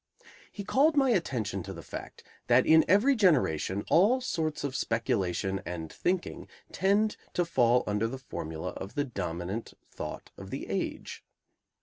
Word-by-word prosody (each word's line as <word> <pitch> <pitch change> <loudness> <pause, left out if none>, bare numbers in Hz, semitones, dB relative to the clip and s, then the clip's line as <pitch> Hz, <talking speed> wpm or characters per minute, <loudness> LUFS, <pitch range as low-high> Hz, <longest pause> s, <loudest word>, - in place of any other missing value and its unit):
He 200 - -6
called 295 +8 +3
my 270 -2 +4
attention 125 - -1
to 95 +2 -7
the 85 -3 -9
fact - - -9 0.2
that 125 +1 +5
in 160 0 +6
every 210 - +4
generation 125 - +2
all 210 +10 +4
sorts 160 - -2
of 140 -2 -3
speculation 95 -5 -1
and 80 -4 -6
thinking 185 0 -2 0.2
tend 205 +3 +2 0.2
to 175 - +2
fall 125 -6 +3
under 105 +2 0
the 130 +4 -5
formula 80 -11 -5
of 95 - -8
the 145 - +1
dominant 95 - -4 0.2
thought - - -7
of - - -9
the - - -5
age. - - -4
125 Hz, 150 wpm, -29 LUFS, -, 0.2 s, in